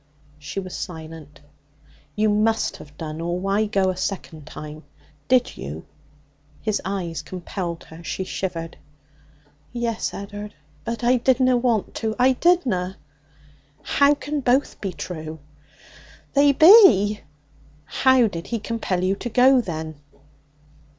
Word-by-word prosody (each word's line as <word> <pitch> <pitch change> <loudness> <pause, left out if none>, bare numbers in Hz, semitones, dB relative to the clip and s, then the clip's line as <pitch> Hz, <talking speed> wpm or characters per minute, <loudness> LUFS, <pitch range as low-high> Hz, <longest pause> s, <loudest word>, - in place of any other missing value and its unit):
She 145 +5 -5
was 185 -2 -7
silent. 160 -4 -8 0.7
'You 215 +1 +2
must 215 +2 +1
have 145 -1 -14
done, 155 0 -6
or 175 +1 -2
why 200 +3 +1
go 195 -2 +1
a - - -6
second 165 -5 -5
time? 155 0 -9 0.4
Did 255 -1 +2
you?' 75 +5 -7 0.7
His 215 -2 -1
eyes 185 -4 -3
compelled 175 -2 -5
her. 160 +1 -13
She 190 - -3
shivered. 170 -3 -5 0.9
'Yes, 235 -2 -2
Ed'ard. 205 +1 -8 0.3
But 230 0 -4
I 250 +1 +4
didna 255 +1 +3
want 235 -4 0
to. 220 -1 -1
I 255 +1 +5
didna!' 240 - +1 0.9
'How 285 +1 +4
can 290 +1 -3
both 260 +1 +1
be 195 - -2
true?' 160 -1 -7 1.0
'They 285 0 +5
be.' 265 - +7 0.7
'How 260 +6 +4
did 175 -6 -4
he 235 - -2
compel 210 -4 -2
you 190 +1 +1
to 240 - -5
go, 255 +3 +5
then?' 160 -6 -6
200 Hz, 130 wpm, -23 LUFS, 170-240 Hz, 1.0 s, be